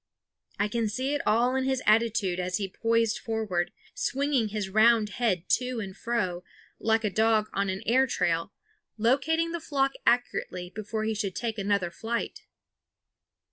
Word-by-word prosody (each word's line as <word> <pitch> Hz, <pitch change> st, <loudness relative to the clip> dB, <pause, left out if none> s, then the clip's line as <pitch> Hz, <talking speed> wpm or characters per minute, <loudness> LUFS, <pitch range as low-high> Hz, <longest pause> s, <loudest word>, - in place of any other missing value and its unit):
I 205 Hz, -, +1 dB
could 225 Hz, 0 st, -1 dB
see 260 Hz, +6 st, -1 dB
it 290 Hz, -, 0 dB
all 240 Hz, +4 st, +3 dB
in 265 Hz, -, +1 dB
his 265 Hz, -1 st, 0 dB
attitude 215 Hz, -4 st, +2 dB
as 180 Hz, 0 st, -1 dB
he 200 Hz, -2 st, -2 dB
poised 230 Hz, +2 st, +1 dB
forward, 215 Hz, -6 st, -2 dB, 0.2 s
swinging 270 Hz, -3 st, 0 dB
his 210 Hz, -2 st, -3 dB
round 215 Hz, +2 st, +4 dB
head 205 Hz, -6 st, -1 dB
to 250 Hz, -1 st, -3 dB
and 190 Hz, -3 st, -6 dB
fro, 185 Hz, -7 st, -2 dB, 0.4 s
like 225 Hz, 0 st, +2 dB
a 210 Hz, -, +1 dB
dog 220 Hz, +1 st, +2 dB
on 200 Hz, 0 st, 0 dB
an 190 Hz, +1 st, -3 dB
air 260 Hz, +4 st, +4 dB
trail, 165 Hz, -5 st, 0 dB, 0.5 s
locating 285 Hz, +9 st, +2 dB
the 340 Hz, -, -3 dB
flock 275 Hz, -4 st, 0 dB, 0.2 s
accurately 185 Hz, -7 st, 0 dB
before 215 Hz, +1 st, -4 dB
he 220 Hz, 0 st, 0 dB
should 200 Hz, -3 st, -3 dB
take 225 Hz, -2 st, -3 dB
another 200 Hz, -3 st, 0 dB
flight. 230 Hz, +6 st, -4 dB
220 Hz, 160 wpm, -28 LUFS, 200-245 Hz, 0.5 s, round